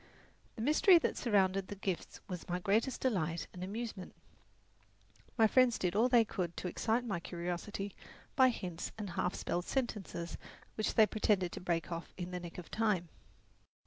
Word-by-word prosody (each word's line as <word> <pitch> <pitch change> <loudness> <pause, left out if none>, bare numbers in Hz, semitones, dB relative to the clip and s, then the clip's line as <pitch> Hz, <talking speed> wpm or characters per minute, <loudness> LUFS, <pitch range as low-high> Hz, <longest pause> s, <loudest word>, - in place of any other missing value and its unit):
The 225 - -4
mystery 310 - +6
that 330 - 0
surrounded 195 -4 +2
the 205 - -6
gifts 190 -2 -4
was 180 -2 -6
my 175 - 0
greatest 215 +7 +1
delight 175 -10 0
and 180 - -6
amusement. 210 -1 -5 1.2
My 225 - +6
friends 250 +1 +4
did 180 0 -1
all 235 +4 +4
they 240 -2 +6
could 175 -5 -3
to - - -3
excite 230 +6 0
my 195 -7 -2
curiosity 180 +4 -4 0.4
by 260 -1 +7
hints 180 -8 -4
and 205 -4 -5
half 180 +1 -1
spelled 175 +1 -2
sentences 210 -9 -3 0.3
which 215 - -1
they 220 - +8
pretended 205 -4 +1
to - - -7
break 170 -1 -1
off 170 0 -6
in 180 0 -5
the 180 - -3
nick 175 -1 -8
of 180 - -9
time. 210 -6 +1
195 Hz, 170 wpm, -34 LUFS, 175-225 Hz, 1.2 s, they